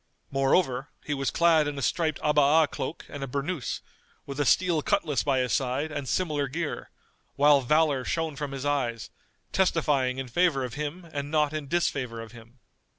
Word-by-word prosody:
Moreover, 135 Hz, -1 st, +1 dB, 0.2 s
he 145 Hz, -, -1 dB
was 135 Hz, -1 st, -1 dB
clad 165 Hz, -3 st, +4 dB
in 145 Hz, -1 st, -4 dB
a -, -, -3 dB
striped 160 Hz, -3 st, 0 dB
Abá 150 Hz, +1 st, +4 dB
cloak 140 Hz, +5 st, -5 dB
and 145 Hz, -, -7 dB
a -, -, -3 dB
burnous, 140 Hz, +3 st, -3 dB, 0.4 s
with 140 Hz, 0 st, -6 dB
a 145 Hz, -, +2 dB
steel 175 Hz, -4 st, +3 dB
cutlass 150 Hz, -2 st, +1 dB
by 140 Hz, -2 st, +1 dB
his 125 Hz, -2 st, -1 dB
side 135 Hz, +4 st, 0 dB
and 140 Hz, -4 st, -4 dB
similar 150 Hz, -5 st, 0 dB
gear, 155 Hz, +3 st, -4 dB, 0.5 s
while 145 Hz, 0 st, +5 dB
valour 145 Hz, 0 st, +2 dB
shone 160 Hz, 0 st, -2 dB
from 145 Hz, -1 st, -4 dB
his 135 Hz, 0 st, -5 dB
eyes, 125 Hz, -6 st, -1 dB, 0.4 s
testifying 145 Hz, -8 st, +1 dB
in 130 Hz, -1 st, -4 dB
favour 145 Hz, 0 st, +2 dB
of 125 Hz, -, -5 dB
him 150 Hz, +4 st, -5 dB
and 145 Hz, 0 st, -3 dB
not 150 Hz, -1 st, +1 dB
in 155 Hz, -2 st, -4 dB
disfavour 135 Hz, -7 st, -1 dB
of 115 Hz, -1 st, -8 dB
him. 120 Hz, +1 st, -15 dB
145 Hz, 180 wpm, -27 LUFS, 135-155 Hz, 0.5 s, while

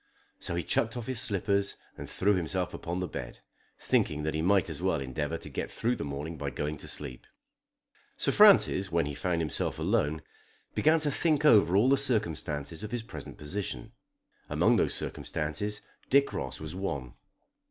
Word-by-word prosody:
So 85 Hz, -, -2 dB
he 85 Hz, -, -1 dB
chucked 115 Hz, +8 st, 0 dB
off 120 Hz, -, -5 dB
his 130 Hz, -2 st, -1 dB
slippers, 100 Hz, -1 st, +1 dB, 0.2 s
and -, -, -8 dB
threw 105 Hz, +2 st, +2 dB
himself 90 Hz, 0 st, -1 dB
upon 85 Hz, +2 st, -4 dB
the 90 Hz, -, -1 dB
bed, -, -, -6 dB, 0.4 s
thinking 75 Hz, 0 st, +1 dB
that 80 Hz, -, -1 dB
he 80 Hz, -, -1 dB
might 95 Hz, +1 st, +3 dB
as -, -, -5 dB
well -, -, +1 dB
endeavour 65 Hz, -2 st, -3 dB
to -, -, -9 dB
get -, -, -4 dB
through 120 Hz, +2 st, 0 dB
the -, -, -4 dB
morning 70 Hz, +3 st, -5 dB
by 70 Hz, 0 st, -2 dB
going 75 Hz, +2 st, -3 dB
to -, -, -10 dB
sleep. 65 Hz, -, -4 dB, 0.9 s
Sir -, -, +2 dB
Francis 95 Hz, -1 st, +6 dB
when 85 Hz, -1 st, +2 dB
he 75 Hz, -, -4 dB
found 85 Hz, +3 st, -1 dB
himself 80 Hz, -, -1 dB
alone 75 Hz, +1 st, 0 dB, 0.5 s
began 160 Hz, +2 st, +4 dB
to 150 Hz, -1 st, +1 dB
think 150 Hz, 0 st, +1 dB
over 105 Hz, -, +6 dB
all 110 Hz, +5 st, +5 dB
the 140 Hz, +1 st, +5 dB
circumstances 80 Hz, -, -1 dB
of 105 Hz, -, -6 dB
his 120 Hz, -2 st, -2 dB
present 115 Hz, -, -9 dB
position. 75 Hz, -5 st, -4 dB, 0.6 s
Among -, -, +3 dB
those -, -, +1 dB
circumstances 80 Hz, +8 st, -3 dB, 0.3 s
Dick 140 Hz, +1 st, +4 dB
Ross 65 Hz, +1 st, -4 dB
was 80 Hz, 0 st, -6 dB
one. 70 Hz, -10 st, -4 dB
90 Hz, 180 wpm, -29 LUFS, 75-110 Hz, 0.9 s, Francis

